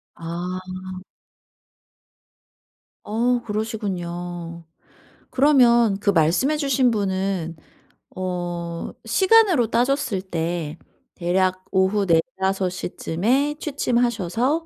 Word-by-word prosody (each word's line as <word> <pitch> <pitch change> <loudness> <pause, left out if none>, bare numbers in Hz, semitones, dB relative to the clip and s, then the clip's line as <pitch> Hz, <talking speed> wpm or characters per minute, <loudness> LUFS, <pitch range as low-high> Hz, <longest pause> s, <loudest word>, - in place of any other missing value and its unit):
아. 175 +2 -4 2.5
어 240 +3 +1
그러시군요. 175 -6 -4 0.7
그러면 240 -7 +4
그 200 - 0
말씀해 185 - +3
주신 275 -4 +2
분은 190 -5 -1 0.6
어 175 -2 -4
시간으로 380 - +4
따졌을 250 -4 +1
때 170 -3 -3 0.4
대략 185 +1 0
"오후 190 +1 +2
4-5 190 +2 +1
시쯤에 225 - -1
취침하셔서 245 - 0
195 Hz, 160 characters per minute, -23 LUFS, 175-245 Hz, 2.5 s, 그러면